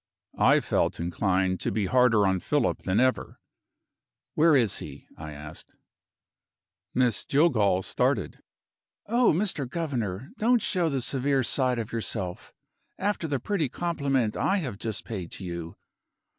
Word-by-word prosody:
I -, -, +5 dB
felt -, -, 0 dB
inclined 95 Hz, +2 st, 0 dB
to -, -, -1 dB
be 105 Hz, -3 st, 0 dB
harder 125 Hz, -2 st, +4 dB
on 95 Hz, -1 st, +2 dB
Philip -, -, 0 dB
than 95 Hz, +4 st, 0 dB
ever. 130 Hz, +1 st, 0 dB, 0.9 s
"Where 160 Hz, 0 st, +5 dB
is 115 Hz, -7 st, +2 dB
he?" -, -, -9 dB
I 80 Hz, -1 st, -8 dB
asked. 75 Hz, +1 st, -10 dB, 1.2 s
Miss 125 Hz, -4 st, +2 dB
Jillgall 110 Hz, -, +2 dB
started. -, -, -1 dB, 0.7 s
"Oh, 240 Hz, +2 st, +3 dB
Mr. 160 Hz, -7 st, -1 dB
Governor, 130 Hz, -, -3 dB
don't 235 Hz, 0 st, +3 dB
show 180 Hz, -5 st, +1 dB
the 135 Hz, -3 st, -1 dB
severe 135 Hz, +1 st, 0 dB
side 125 Hz, 0 st, +1 dB
of 115 Hz, -1 st, -4 dB
yourself, 105 Hz, -5 st, -3 dB, 0.5 s
after 200 Hz, -4 st, -1 dB
the 140 Hz, -3 st, -1 dB
pretty 160 Hz, -, -1 dB
compliment 140 Hz, -8 st, -1 dB
I 195 Hz, -, +1 dB
have 130 Hz, -, -3 dB
just 110 Hz, -2 st, -4 dB
paid 95 Hz, -7 st, -5 dB
to 95 Hz, -, -7 dB
you! 85 Hz, -1 st, -6 dB
125 Hz, 140 wpm, -27 LUFS, 95-150 Hz, 1.2 s, I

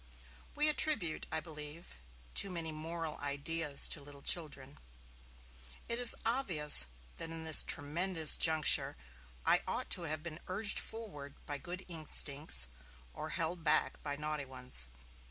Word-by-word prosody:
We 300 Hz, +1 st, +3 dB
attribute, 295 Hz, -, +1 dB
I 160 Hz, -, -3 dB
believe, 150 Hz, -, -8 dB, 0.4 s
too 195 Hz, -, +2 dB
many 165 Hz, -3 st, -3 dB
moral 160 Hz, 0 st, -7 dB
ideas 145 Hz, +1 st, +1 dB
to 150 Hz, -, -2 dB
little 140 Hz, 0 st, -13 dB
children. 145 Hz, -5 st, -2 dB, 1.1 s
It 235 Hz, +1 st, -1 dB
is 245 Hz, -1 st, +8 dB
obvious 175 Hz, -, +3 dB, 0.3 s
that 165 Hz, -, -7 dB
in 165 Hz, 0 st, -9 dB
this 160 Hz, -1 st, +8 dB
tremendous 160 Hz, +2 st, +1 dB
juncture 160 Hz, -2 st, +4 dB, 0.5 s
I -, -, +4 dB
ought -, -, -5 dB
to -, -, +4 dB
have 155 Hz, 0 st, -4 dB
been 165 Hz, -2 st, -9 dB
urged 205 Hz, +3 st, +2 dB
forward 150 Hz, -12 st, -9 dB
by 145 Hz, -1 st, -4 dB
good 180 Hz, +6 st, -8 dB
instincts, 150 Hz, -, +2 dB, 0.5 s
or -, -, -8 dB
held 165 Hz, +1 st, -4 dB
back 150 Hz, -, +1 dB
by 145 Hz, -1 st, -5 dB
naughty 150 Hz, -1 st, -5 dB
ones. 125 Hz, -, -5 dB
155 Hz, 135 wpm, -32 LUFS, 145-175 Hz, 1.1 s, is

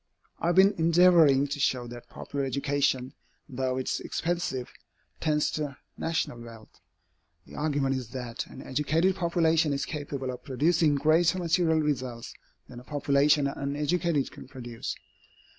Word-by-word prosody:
I -, -, -1 dB
have 175 Hz, -, +2 dB
been 195 Hz, +2 st, +6 dB
endeavoring 165 Hz, -4 st, +5 dB
to 145 Hz, +1 st, -4 dB
show 130 Hz, -3 st, +1 dB
that 120 Hz, 0 st, -10 dB
popular 140 Hz, -1 st, -5 dB
education, 135 Hz, -1 st, 0 dB, 0.3 s
though 130 Hz, -1 st, -2 dB
it 130 Hz, -, -3 dB
is -, -, -1 dB
expensive, 170 Hz, -7 st, -3 dB, 0.5 s
tends 150 Hz, -2 st, +1 dB
to 145 Hz, -4 st, -4 dB, 0.2 s
national 160 Hz, -7 st, -2 dB
wealth. 115 Hz, -2 st, -13 dB, 0.7 s
The -, -, -15 dB
argument 145 Hz, -3 st, 0 dB
is 130 Hz, -3 st, -4 dB
that 120 Hz, -1 st, -5 dB
an -, -, -11 dB
educated 160 Hz, +7 st, +1 dB
population 165 Hz, -3 st, +2 dB
is 140 Hz, 0 st, -2 dB
capable 140 Hz, -3 st, -4 dB
of 125 Hz, -, -9 dB
producing 155 Hz, +2 st, +2 dB
greater 160 Hz, +5 st, +3 dB
material 165 Hz, -2 st, +2 dB
results 130 Hz, -5 st, -3 dB, 0.3 s
than 120 Hz, -, -10 dB
a -, -, -13 dB
population 145 Hz, +1 st, +2 dB
uneducated 145 Hz, +3 st, -1 dB
can -, -, -12 dB
produce. 120 Hz, -4 st, -6 dB
145 Hz, 140 wpm, -28 LUFS, 130-160 Hz, 0.7 s, been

